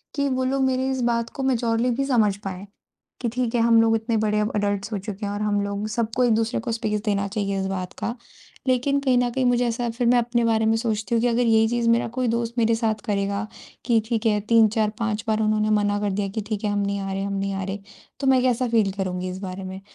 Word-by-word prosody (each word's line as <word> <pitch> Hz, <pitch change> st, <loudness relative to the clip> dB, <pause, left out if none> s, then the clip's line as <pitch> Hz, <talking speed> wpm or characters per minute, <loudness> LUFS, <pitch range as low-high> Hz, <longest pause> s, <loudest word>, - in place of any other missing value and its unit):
कि 280 Hz, -1 st, +1 dB
वो 260 Hz, 0 st, 0 dB
लोग 265 Hz, +1 st, +1 dB
मेरी 260 Hz, 0 st, +1 dB
इस 260 Hz, -1 st, -2 dB
बात 235 Hz, 0 st, -1 dB
को 270 Hz, -, -3 dB
मैच्योरली 240 Hz, -2 st, +1 dB
भी 270 Hz, +3 st, -1 dB
समझ 225 Hz, -7 st, +2 dB
पाएँ, 190 Hz, 0 st, -6 dB, 0.6 s
कि 240 Hz, -, 0 dB
ठीक 245 Hz, 0 st, -2 dB
है 235 Hz, -, +3 dB
हम 230 Hz, 0 st, +5 dB
लोग 225 Hz, 0 st, +3 dB
इतने 225 Hz, +1 st, -1 dB
बड़े 210 Hz, -1 st, +1 dB
अब 210 Hz, +1 st, 0 dB
एडल्ट्स 205 Hz, 0 st, -1 dB
हो -, -, 0 dB
चुके 200 Hz, +1 st, -6 dB
हैं 200 Hz, -, -3 dB
और 205 Hz, -, -4 dB
हम 205 Hz, -1 st, +1 dB
लोग 200 Hz, +1 st, -3 dB
सबको 230 Hz, +2 st, -1 dB
एक-दूसरे 225 Hz, -1 st, +1 dB
को 230 Hz, -, -3 dB
स्पेस 220 Hz, -2 st, -1 dB
देना 200 Hz, -2 st, 0 dB
चाहिए 200 Hz, -1 st, -2 dB
इस 190 Hz, -, -2 dB
बात 185 Hz, -2 st, -4 dB
का। 235 Hz, -, -3 dB, 0.5 s
लेकिन 260 Hz, +2 st, +2 dB
कहीं 260 Hz, -3 st, +2 dB
न 245 Hz, 0 st, +2 dB
कहीं 260 Hz, +1 st, 0 dB
मुझे 245 Hz, 0 st, +3 dB
ऐसा 235 Hz, +1 st, -1 dB
फ़िर 235 Hz, +1 st, -1 dB
मैं 245 Hz, +1 st, +5 dB
अपने 240 Hz, 0 st, 0 dB
बारे 225 Hz, -1 st, +2 dB
में 220 Hz, 0 st, +3 dB
सोचती 220 Hz, -1 st, -1 dB
हूँ 230 Hz, -, +2 dB
कि 245 Hz, -, +2 dB
अगर 240 Hz, 0 st, +1 dB
यही 225 Hz, -2 st, +4 dB
चीज़ 235 Hz, 0 st, +1 dB
मेरा 230 Hz, 0 st, +3 dB
कोई 255 Hz, -1 st, +1 dB
दोस्त 235 Hz, 0 st, -1 dB
मेरे 230 Hz, -1 st, +3 dB
साथ 220 Hz, -2 st, -1 dB
करेगा 200 Hz, +1 st, -1 dB, 0.4 s
कि 235 Hz, -2 st, +3 dB
ठीक 230 Hz, -1 st, -1 dB
है 210 Hz, -2 st, +3 dB
3-4-5 220 Hz, -1 st, +2 dB
बार 220 Hz, 0 st, +1 dB
उन्होंने 215 Hz, 0 st, +1 dB
मना 205 Hz, 0 st, 0 dB
कर 205 Hz, -1 st, 0 dB
दिया 200 Hz, +1 st, -1 dB
कि 215 Hz, +3 st, -3 dB
ठीक 215 Hz, -1 st, -3 dB
है 205 Hz, -, +1 dB
हम 205 Hz, -, 0 dB
नहीं 200 Hz, 0 st, -1 dB
आ 195 Hz, 0 st, -4 dB
रहे 195 Hz, 0 st, -2 dB
हम 200 Hz, 0 st, -3 dB
नहीं 195 Hz, 0 st, -2 dB
आ 195 Hz, 0 st, -3 dB
रहे, 195 Hz, +2 st, -4 dB, 0.4 s
तो 275 Hz, -, -1 dB
मैं 260 Hz, -1 st, +5 dB
कैसा 255 Hz, 0 st, +1 dB
फ़ील 220 Hz, -4 st, +2 dB
करूँगी 185 Hz, -1 st, -2 dB
इस 185 Hz, +1 st, -6 dB
बारे 190 Hz, 0 st, -6 dB
में। 190 Hz, +1 st, -7 dB
225 Hz, 260 wpm, -23 LUFS, 205-240 Hz, 0.6 s, हम